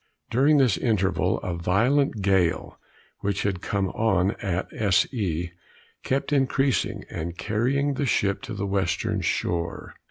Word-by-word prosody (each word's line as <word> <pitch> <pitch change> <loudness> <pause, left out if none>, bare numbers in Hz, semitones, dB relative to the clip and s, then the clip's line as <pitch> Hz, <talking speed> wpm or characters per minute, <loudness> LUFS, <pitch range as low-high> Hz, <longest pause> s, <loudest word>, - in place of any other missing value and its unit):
During 140 +6 +4
this 125 -10 +3
interval 100 -5 +1
a 90 - -3
violent 110 +7 +1
gale, 95 -3 +1 0.4
which 100 -1 -1
had 95 -3 -1
come 100 -1 -1
on 95 -3 +1
at 95 -2 -2
S. 100 -3 +3
E. 90 -7 -2 0.5
kept 140 +2 -1
increasing, 135 -1 +1
and 85 +2 -5
carrying 135 +7 0
the 140 +1 -1
ship 100 -4 +1
to 115 -5 -6
the 100 0 -3
western 95 -3 -1
shore. 85 -1 -2
100 Hz, 135 wpm, -25 LUFS, 90-130 Hz, 0.5 s, During